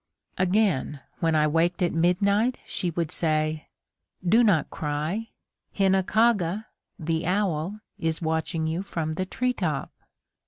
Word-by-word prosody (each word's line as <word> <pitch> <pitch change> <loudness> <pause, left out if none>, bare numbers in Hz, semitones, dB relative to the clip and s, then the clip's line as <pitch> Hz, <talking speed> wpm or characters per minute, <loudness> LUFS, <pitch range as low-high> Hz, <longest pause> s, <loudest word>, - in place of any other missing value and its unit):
Again, 185 -7 +1 0.2
when 165 -2 +2
I 150 0 +4
waked 165 +4 +1
at 175 - +1
midnight, 200 +8 +2
she 180 - -2
would 165 -1 -2
say: 155 -1 0 0.6
"Do 225 +7 +5
not 180 -10 +3
cry! 155 +9 -2 0.5
Hinakaga 195 0 +2 0.3
(the 165 -1 -1
owl) 190 0 0 0.2
is 160 0 -1
watching 160 0 -1
you 160 +3 -1
from 165 -5 -3
the 185 +3 -3
tree 250 +5 0
top." 155 - -2
175 Hz, 125 wpm, -26 LUFS, 160-200 Hz, 0.6 s, Do